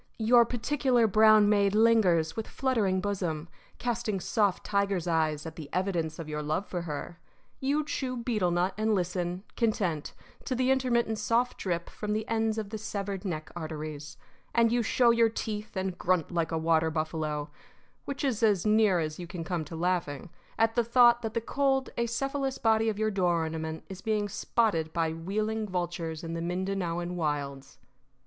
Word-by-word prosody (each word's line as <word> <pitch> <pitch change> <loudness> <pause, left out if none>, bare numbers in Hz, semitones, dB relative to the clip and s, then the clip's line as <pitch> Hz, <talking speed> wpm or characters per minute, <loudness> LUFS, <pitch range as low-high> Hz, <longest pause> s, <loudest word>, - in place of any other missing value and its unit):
Your 235 +1 +5
particular 245 0 +1
brown 215 0 +6
maid 205 -1 +3
lingers, 205 -8 +4
with 225 - -4
fluttering 220 -8 0
bosom, 175 -6 -2 0.3
casting 235 -4 -2
soft 205 0 +1
tiger's 200 -3 0
eyes 155 -2 0
at 160 -1 -8
the 150 -3 -8
evidence 175 -4 -1
of 165 - -6
your 150 0 -3
love 155 +6 -1
for 180 -2 -4
her. 165 +1 -6 0.4
You 290 +3 0
chew 255 -4 -3
betel 225 -6 0
nut 175 +2 +1
and 215 0 +2
listen, 180 0 -2
content, 190 -10 -1 0.3
to 255 - -1
the 255 +1 +2
intermittent 235 -4 +1
soft 235 +4 +1
drip 170 -3 -2
from 210 -1 -4
the 215 +1 -2
ends 225 -1 0
of 210 -2 -4
the 220 - -4
severed 200 -2 -4
neck 155 -4 -4
arteries. 155 -2 -6 0.4
And 230 -1 +4
you 240 0 +2
show 235 +1 +4
your 230 -1 +4
teeth 215 -2 -5
and 190 -1 -2
grunt 180 -2 0
like 170 -2 -1
a 165 - 0
water 160 0 +2
buffalo 155 -2 -2 0.5
which 280 0 -4
is 255 -6 0
as 210 -5 +3
near 210 -3 +4
as 155 0 -3
you 175 - -6
can 170 -1 -6
come 170 -1 -2
to 165 - -8
laughing 170 -3 -2 0.3
at 225 0 +3
the 240 - +2
thought 240 0 +5
that 225 -2 -4
the 230 - +1
cold, 270 +2 0
acephalous 270 +3 -1
body 225 0 +3
of 210 - -3
your 215 0 +1
door 175 -4 +1
ornament 160 0 -4
is 190 -1 -9
being 215 -1 0
spotted 195 -7 0
by 165 -2 0
wheeling 215 +6 -2
vultures 175 -3 -3
in 165 0 -4
the 165 - -3
Mindanaoan 175 -1 -2
wilds. 140 -4 -3
195 Hz, 175 wpm, -29 LUFS, 165-225 Hz, 0.5 s, brown